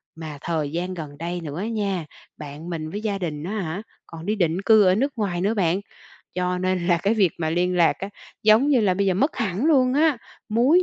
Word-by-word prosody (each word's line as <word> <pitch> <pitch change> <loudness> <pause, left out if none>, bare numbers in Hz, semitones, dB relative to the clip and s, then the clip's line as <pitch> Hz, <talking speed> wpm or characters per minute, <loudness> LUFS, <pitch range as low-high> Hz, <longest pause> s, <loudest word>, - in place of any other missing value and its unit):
mà 160 -2 -7
thời 155 -4 -2
gian 175 +3 -3
gần 150 -5 -7
đây 175 +3 -4
nữa 155 0 -5
á 205 - -2
nha, 200 -7 -2 0.3
bạn 150 +3 -8
mình 160 -2 -4
với 205 - -4
gia 205 -3 -2
đình 155 -5 -4
á 180 - -4
hả, 175 +2 -4 0.3
còn 165 0 -9
đi 210 +2 0
định 175 -2 0
cư 215 +1 +6
ở 185 -1 +4
nước 275 +6 0
ngoài 190 -5 -1
nữa 205 +4 +1
bạn. 190 -2 +1 0.5
Cho 180 0 -1
nên 185 -1 0
là 175 -2 +4
cái 200 +6 +1
việc 195 -6 +3
mà 160 -2 -1
liên 180 +2 +1
lạc 170 -2 +5
á, 195 - -4 0.3
giống 220 +6 +5
như 270 -5 +4
là, 195 -4 +2
bây 200 +2 0
giờ 190 - +2
mất 280 - +1
hẳn 200 +2 -1
luôn 260 -5 +4
á, 300 -2 +3 0.3
múi 255 +11 +4
185 Hz, 240 wpm, -23 LUFS, 170-215 Hz, 0.5 s, cư